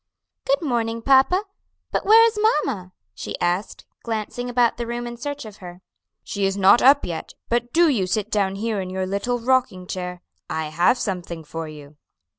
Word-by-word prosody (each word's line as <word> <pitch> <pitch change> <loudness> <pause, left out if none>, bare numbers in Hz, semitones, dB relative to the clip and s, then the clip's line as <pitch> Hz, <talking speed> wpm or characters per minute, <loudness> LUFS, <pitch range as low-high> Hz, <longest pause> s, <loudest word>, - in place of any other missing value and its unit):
"Good 280 +4 +2
morning, 230 -4 -1
papa. 275 - +4 0.5
But - - -2
where 450 +2 +8
is 460 -1 +1
mamma?" 275 - 0 0.2
she 100 +3 -6
asked, 175 +4 -2 0.2
glancing 230 +2 -4
about 245 -1 +2
the 235 -1 -4
room 240 +1 -4
in 240 0 -6
search 285 +3 -5
of 215 -1 -11
her. 180 0 -11 0.4
"She 200 - -4
is 195 +1 -2
not 195 +4 +6
up 280 +2 +6
yet, 170 -2 -6
but 240 +1 0
do 340 +1 +5
you 220 -11 +1
sit 215 +2 -2
down 195 -2 +1
here 215 0 -2
in 185 - -5
your 185 0 -2
little 200 +6 -1
rocking 240 -6 0
chair. 180 -1 -6 0.3
I 160 -1 -3
have 175 +10 +3
something 175 -6 -4
for 160 +1 -6
you." 150 -1 -12
215 Hz, 185 wpm, -22 LUFS, 185-245 Hz, 0.5 s, where